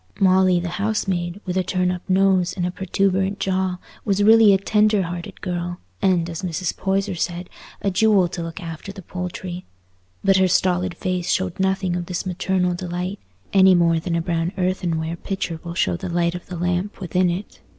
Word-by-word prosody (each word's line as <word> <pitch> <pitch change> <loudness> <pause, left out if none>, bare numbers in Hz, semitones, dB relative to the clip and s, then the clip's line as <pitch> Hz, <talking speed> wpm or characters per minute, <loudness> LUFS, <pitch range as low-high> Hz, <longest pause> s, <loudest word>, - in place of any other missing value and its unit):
Molly, 185 -1 +4
the 175 +1 -4
housemaid, 195 -4 -1
with 180 -1 -3
a 185 - +2
turn 180 0 0
up 180 -1 -4
nose 185 -1 +3
and 175 - 0
a 180 - -1
protuberant 190 +1 0
jaw, 190 -1 0 0.3
was 200 -2 +1
really 220 0 +7
a 195 - +5
tender 210 0 +2
hearted 175 0 -6
girl, 175 -1 -3 0.2
and, 175 -3 +2
as 165 -2 -5
Mrs. 180 -1 -2
Poyser 195 0 0
said, 175 +1 -3 0.3
a 200 - +1
jewel 195 -1 +4
to 175 -1 -5
look 165 +2 -6
after 165 +2 -7
the 195 -1 -11
poultry; 180 0 -5 0.6
but 195 -1 +4
her 190 0 +4
stolid 180 0 +1
face 185 -2 -2
showed 185 -1 0
nothing 190 -1 +1
of 175 -1 -3
this 180 0 -3
maternal 185 0 0
delight, 180 +2 -4 0.3
any 190 -1 +7
more 170 -1 +3
than 170 +1 -2
a 165 - 0
brown 165 0 -1
earthenware 170 -3 -1
pitcher 185 -3 -4
will 170 -1 -6
show 90 - +1
the 85 - -5
light 170 0 +1
of 180 - -8
the 180 - -6
lamp 180 +4 -1
within 180 -1 +1
it. 180 +4 -5
180 Hz, 190 wpm, -22 LUFS, 175-190 Hz, 0.6 s, really